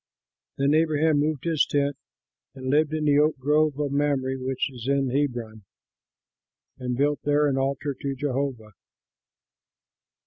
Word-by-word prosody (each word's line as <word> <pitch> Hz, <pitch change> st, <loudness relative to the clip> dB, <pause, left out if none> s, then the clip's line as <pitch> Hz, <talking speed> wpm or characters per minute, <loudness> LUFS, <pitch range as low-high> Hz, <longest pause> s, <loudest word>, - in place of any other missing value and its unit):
Then 140 Hz, +1 st, +2 dB
Abraham 155 Hz, -1 st, +3 dB
moved 150 Hz, -2 st, -1 dB
his 165 Hz, -3 st, +2 dB
tent 140 Hz, -1 st, 0 dB, 0.6 s
and 130 Hz, -1 st, -4 dB
lived 150 Hz, +1 st, +3 dB
in 155 Hz, -1 st, -1 dB
the 145 Hz, -1 st, +4 dB
oak 150 Hz, 0 st, +2 dB
grove 150 Hz, +2 st, +1 dB
of 145 Hz, -2 st, -1 dB
Mamre, 140 Hz, -2 st, 0 dB
which 130 Hz, 0 st, -1 dB
is 125 Hz, -1 st, -8 dB
in 140 Hz, -2 st, +1 dB
Hebron, 120 Hz, -6 st, -2 dB, 1.2 s
and 125 Hz, -1 st, -3 dB
built 145 Hz, +1 st, +1 dB
there 145 Hz, +1 st, +2 dB
an 140 Hz, -, 0 dB
altar 140 Hz, +1 st, -1 dB
to 135 Hz, +1 st, -4 dB
Jehovah. 130 Hz, -5 st, -3 dB
140 Hz, 140 wpm, -25 LUFS, 130-150 Hz, 1.2 s, the